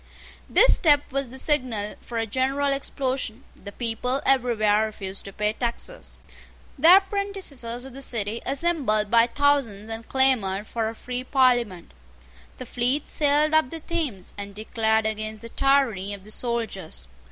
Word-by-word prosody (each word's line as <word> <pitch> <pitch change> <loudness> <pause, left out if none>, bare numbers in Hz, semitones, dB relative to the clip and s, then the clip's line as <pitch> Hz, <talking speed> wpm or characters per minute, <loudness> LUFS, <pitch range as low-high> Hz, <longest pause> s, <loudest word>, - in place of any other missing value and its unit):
This - - +7
step 290 -3 +4
was 275 -1 -2
the 260 - -8
signal 255 -8 0
for 235 - -7
a 225 - 0
general 270 +5 0
explosion. 265 -3 -3
The 200 - -10
people 240 +4 -1
everywhere 220 -5 +2
refused 195 -2 -5
to 195 - -7
pay 210 +2 -1
taxes. 240 - -4 0.6
The 345 +4 +8
apprentices 390 - -3
of 240 +3 -6
the 275 - -9
City 225 -3 -2
assembled 270 -8 0
by 230 0 +5
thousands 245 -6 +1
and 225 0 -7
clamoured 220 -7 +2
for 225 0 -2
a 225 - -8
free 250 +2 -5
Parliament. 245 - +1 0.7
The 255 - -7
fleet 250 +5 +1
sailed 300 +1 +2
up 315 -4 +3
the 325 - -7
Thames, 300 - -4
and 200 0 -7
declared 220 0 0
against 215 0 -4
the 230 - -8
tyranny 230 -8 +1
of 195 - -15
the 215 - -8
soldiers. 225 - -3
240 Hz, 150 wpm, -24 LUFS, 215-275 Hz, 0.7 s, The